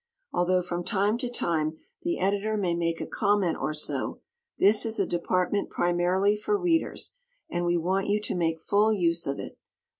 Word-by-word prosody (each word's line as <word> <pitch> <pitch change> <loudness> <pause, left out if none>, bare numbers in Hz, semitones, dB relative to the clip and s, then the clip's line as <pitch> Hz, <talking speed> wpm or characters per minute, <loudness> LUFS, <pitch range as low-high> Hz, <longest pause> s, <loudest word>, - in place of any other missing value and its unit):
Although 180 +1 +2
from 175 0 -3
time 205 +3 +1
to 250 -2 -1
time 160 -9 -1 0.2
the 345 0 -1
Editor 205 +3 0
may 185 -4 0
make 170 -1 -1
a - - -3
comment 200 -5 +1
or - - 0
so, 150 0 -1 0.4
this 210 +2 +5
is 225 -1 +1
a - - +3
department 180 +3 0
primarily 180 +4 +2
for 310 - 0
Readers, 345 -4 0 0.4
and 175 0 -1
we 175 0 +2
want 190 +4 0
you 205 +1 +2
to - - -2
make 165 -2 0
full 205 +5 +3
use 170 -6 +1
of 140 0 -2
it. - - -8
185 Hz, 180 wpm, -27 LUFS, 175-210 Hz, 0.4 s, this